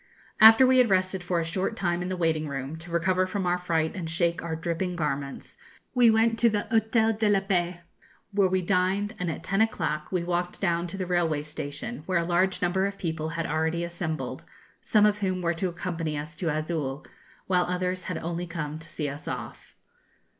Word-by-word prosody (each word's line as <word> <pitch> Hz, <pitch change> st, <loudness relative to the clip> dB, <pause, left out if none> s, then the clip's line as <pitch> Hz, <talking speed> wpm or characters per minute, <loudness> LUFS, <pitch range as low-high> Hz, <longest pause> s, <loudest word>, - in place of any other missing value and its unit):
After 225 Hz, +4 st, +9 dB
we 255 Hz, 0 st, +5 dB
had 245 Hz, -3 st, +5 dB
rested 185 Hz, 0 st, +1 dB
for 180 Hz, -1 st, 0 dB
a -, -, 0 dB
short 185 Hz, +6 st, -2 dB
time 175 Hz, -4 st, -1 dB
in 180 Hz, -, -3 dB
the 185 Hz, -, -2 dB
waiting 160 Hz, -2 st, 0 dB
room, 135 Hz, +1 st, -4 dB
to 165 Hz, +2 st, -10 dB
recover 185 Hz, +2 st, +1 dB
from 195 Hz, 0 st, -2 dB
our 180 Hz, 0 st, +1 dB
fright 165 Hz, -3 st, 0 dB
and 175 Hz, -4 st, -5 dB
shake 170 Hz, +1 st, +1 dB
our 165 Hz, -1 st, -3 dB
dripping 170 Hz, +2 st, -2 dB
garments, 140 Hz, -4 st, -4 dB, 0.4 s
we 245 Hz, -2 st, +6 dB
went 225 Hz, +1 st, +3 dB
to 235 Hz, -, +5 dB
the 210 Hz, 0 st, -1 dB
Hôtel 220 Hz, 0 st, +2 dB
de 215 Hz, -1 st, +3 dB
la 200 Hz, -1 st, +4 dB
Paix, 180 Hz, -3 st, 0 dB, 0.5 s
where 200 Hz, -1 st, +3 dB
we 185 Hz, 0 st, 0 dB
dined, 190 Hz, +3 st, +1 dB
and 180 Hz, -1 st, -1 dB
at 160 Hz, -, -5 dB
ten 195 Hz, +4 st, +1 dB
o'clock 155 Hz, -9 st, -1 dB
we 180 Hz, -2 st, 0 dB
walked 175 Hz, 0 st, -2 dB
down 170 Hz, -2 st, 0 dB
to 195 Hz, -, -6 dB
the 185 Hz, -, -2 dB
railway 170 Hz, -4 st, +1 dB
station, 150 Hz, +8 st, -6 dB
where 185 Hz, -2 st, +2 dB
a 170 Hz, -, +1 dB
large 180 Hz, +2 st, +1 dB
number 190 Hz, +2 st, +2 dB
of 200 Hz, 0 st, -6 dB
people 160 Hz, -3 st, -3 dB
had 165 Hz, 0 st, -3 dB
already 160 Hz, +2 st, 0 dB
assembled, 170 Hz, -2 st, -4 dB, 0.4 s
some 210 Hz, -1 st, +4 dB
of 210 Hz, 0 st, +2 dB
whom 185 Hz, -2 st, -1 dB
were 170 Hz, 0 st, +2 dB
to 170 Hz, +3 st, -1 dB
accompany 165 Hz, -3 st, -3 dB
us 155 Hz, +3 st, -6 dB
to 165 Hz, +1 st, -2 dB
Azul, 155 Hz, -3 st, -2 dB, 0.4 s
while 180 Hz, -1 st, +2 dB
others 180 Hz, 0 st, -2 dB
had 180 Hz, -, -3 dB
only 170 Hz, +1 st, -4 dB
come 155 Hz, -2 st, -4 dB
to 165 Hz, -, -10 dB
see 150 Hz, -, -3 dB
us 145 Hz, +1 st, -7 dB
off. -, -, -7 dB
175 Hz, 210 wpm, -27 LUFS, 160-190 Hz, 0.5 s, After